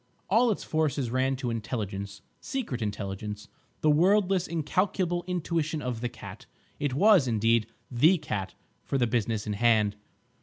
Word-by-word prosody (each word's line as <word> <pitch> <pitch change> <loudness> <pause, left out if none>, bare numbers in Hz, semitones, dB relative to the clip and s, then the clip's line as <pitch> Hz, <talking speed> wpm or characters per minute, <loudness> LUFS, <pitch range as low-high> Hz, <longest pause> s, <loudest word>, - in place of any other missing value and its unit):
All 235 +4 +5
its 215 - -1
forces 145 -6 -1
ran 130 +1 +1
to 130 -2 -3
intelligence—secret 110 - -5
intelligence, 105 0 -5 0.3
the 155 - +4
wordless 185 +3 +3
incalculable 175 +2 0
intuition 165 -3 -1
of 125 -5 -4
the 120 - -1
Cat. 120 -2 -11 0.3
It 140 -3 -1
was, 195 -4 +5
indeed, 115 -1 +2 0.2
the 155 +10 +5
cat 105 - -4 0.3
for 140 - -1
the 125 - +3
business 115 -2 -1
in 105 - -2
hand. 105 -1 +3
130 Hz, 140 wpm, -28 LUFS, 110-170 Hz, 0.3 s, All